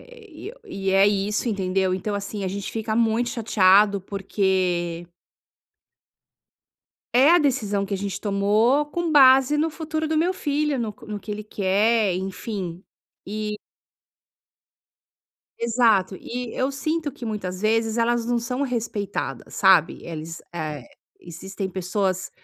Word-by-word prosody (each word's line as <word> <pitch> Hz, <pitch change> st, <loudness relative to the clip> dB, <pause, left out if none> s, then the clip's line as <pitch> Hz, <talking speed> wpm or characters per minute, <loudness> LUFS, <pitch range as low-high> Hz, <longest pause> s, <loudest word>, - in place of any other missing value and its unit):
eh, 470 Hz, -4 st, -16 dB
e 370 Hz, +6 st, -7 dB
eh, -, -, -14 dB
o -, -, -18 dB
e 195 Hz, -, -3 dB
é 195 Hz, +1 st, +5 dB
isso, 205 Hz, +3 st, 0 dB
entendeu? 190 Hz, -2 st, 0 dB
Então, 195 Hz, +3 st, -3 dB
assim, 200 Hz, 0 st, -4 dB
a -, -, -1 dB
gente 200 Hz, +1 st, -5 dB
fica 220 Hz, -1 st, -2 dB
muito 230 Hz, +1 st, +2 dB
chateado 205 Hz, -3 st, +4 dB
porque 185 Hz, -3 st, -1 dB, 2.1 s
é 260 Hz, +4 st, +6 dB
a 350 Hz, -, +7 dB
decisão 220 Hz, -, 0 dB
que 200 Hz, -, -7 dB
a -, -, 0 dB
gente 195 Hz, 0 st, -4 dB
tomou 215 Hz, +8 st, +2 dB
com 335 Hz, +1 st, -2 dB
base 270 Hz, 0 st, +6 dB
no 315 Hz, +2 st, +2 dB
futuro 315 Hz, 0 st, -4 dB
do 315 Hz, -, 0 dB
meu 340 Hz, +4 st, +2 dB
filho, 295 Hz, -4 st, -1 dB
no 225 Hz, -3 st, -2 dB
co -, -, -16 dB
no 210 Hz, -1 st, -5 dB
que 210 Hz, -, -9 dB
ele 210 Hz, 0 st, -5 dB
quer, 205 Hz, +1 st, +1 dB
enfim. 190 Hz, -1 st, -5 dB, 0.4 s
E 210 Hz, +1 st, -3 dB, 2.1 s
Exato. 225 Hz, -5 st, +2 dB
E 245 Hz, +2 st, -6 dB
eu 260 Hz, +2 st, 0 dB
sinto 310 Hz, +1 st, -2 dB
que 240 Hz, -, -9 dB
muitas 190 Hz, -5 st, -4 dB
vezes 225 Hz, +1 st, +1 dB
elas 235 Hz, 0 st, +1 dB
não 240 Hz, 0 st, +1 dB
são 250 Hz, +4 st, -3 dB
respeitadas, 225 Hz, -6 st, -4 dB
sabe? 190 Hz, -5 st, +4 dB
Eles, 165 Hz, 0 st, -7 dB
eh, 155 Hz, -5 st, -5 dB, 0.4 s
existem 190 Hz, +3 st, -6 dB
pessoas, 185 Hz, 0 st, -2 dB
210 Hz, 145 wpm, -23 LUFS, 190-250 Hz, 2.1 s, a